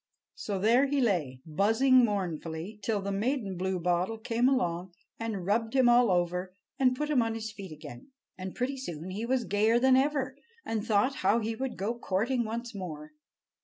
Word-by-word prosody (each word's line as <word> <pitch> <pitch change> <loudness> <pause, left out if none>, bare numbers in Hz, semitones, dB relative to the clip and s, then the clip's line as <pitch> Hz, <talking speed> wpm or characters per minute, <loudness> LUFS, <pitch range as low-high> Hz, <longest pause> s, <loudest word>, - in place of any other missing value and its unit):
So 200 -2 -4
there 235 +8 +4
he 285 0 0
lay, 165 - 0
buzzing 225 - +4
mournfully, 180 -2 -3
till 210 -1 -1
the 200 - -2
maiden 210 -1 -1
bluebottle 180 +2 0
came 230 +3 +1
along 180 -8 -1 0.2
and 220 -5 -3
rubbed 225 +4 0
him 260 -2 +5
all 240 -1 +5
over, 180 +1 0 0.2
and 255 -1 +4
put 300 +3 -2
him 265 -5 +4
on 225 -1 -1
his 220 -1 -5
feet 195 -4 -9
again. 150 - -10 0.3
And 185 0 -7
pretty 265 +2 -2
soon 175 - -6
he 215 +5 -4
was 255 -1 +1
gayer 215 +3 +3
than 260 +1 +5
ever, 265 -1 +1 0.3
and 220 -2 -2
thought 230 +5 +1
how 200 +4 +3
he 225 0 -1
would 260 +1 -4
go 205 +5 -1
courting 235 +2 -1
once 230 +2 -5
more. 155 -6 -7
220 Hz, 180 wpm, -29 LUFS, 185-245 Hz, 0.3 s, him